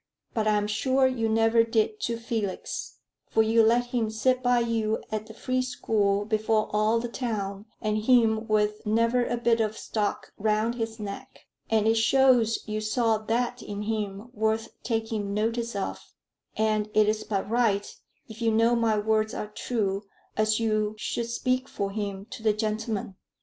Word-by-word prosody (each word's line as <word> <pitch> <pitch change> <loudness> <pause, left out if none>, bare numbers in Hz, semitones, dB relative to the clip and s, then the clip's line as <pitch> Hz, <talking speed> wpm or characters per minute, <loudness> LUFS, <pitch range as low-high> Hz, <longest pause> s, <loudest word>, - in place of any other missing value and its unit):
But 220 -2 0
I'm 210 -1 +2
sure 260 +6 +2
you 240 -4 +1
never 225 +1 +4
did 230 - 0
to 235 - -2
Felix, 225 -4 -4 0.3
for 220 - +3
you 225 +1 +4
let 235 +2 +4
him 230 -3 +1
sit 255 +4 +1
by 245 0 +3
you 225 -2 0
at 215 0 -3
the 220 - -10
Free 255 +2 -1
School 210 -5 0
before 215 0 +1
all 215 +2 +3
the 240 - -3
town, 210 -4 -4 0.2
and 215 0 +1
him 225 -1 +3
with 210 -1 +1
never 230 +3 +2
a 240 - -1
bit 235 -1 +2
of 220 0 -1
stock 210 -2 -3
round 215 +2 +1
his 225 -1 -4
neck. 200 -1 -8 0.2
And 220 -1 +2
it 225 +1 +3
shows 240 -1 +4
you 215 0 -2
saw 220 0 +1
that 240 +3 -1
in 205 0 -5
him 210 +1 -3
worth 220 +1 0
taking 220 -3 -2
notice 230 +1 -1
of; 195 - -3 0.6
and 215 -1 +1
it 215 -1 +5
is 215 0 0
but 200 -2 -2
right, 215 -3 +1 0.3
if 225 +1 -11
you 230 - +3
know 230 +2 +4
my 225 -2 +2
words 215 +1 +1
are 210 - -4
true, 210 -2 -2 0.3
as 215 0 +2
you 215 -1 0
should 235 +2 -3
speak 255 +2 0
for 200 -1 -3
him 200 -1 -4
to - - -7
the 215 -1 +3
gentlemen." 215 -2 -3
220 Hz, 170 wpm, -27 LUFS, 215-230 Hz, 0.6 s, it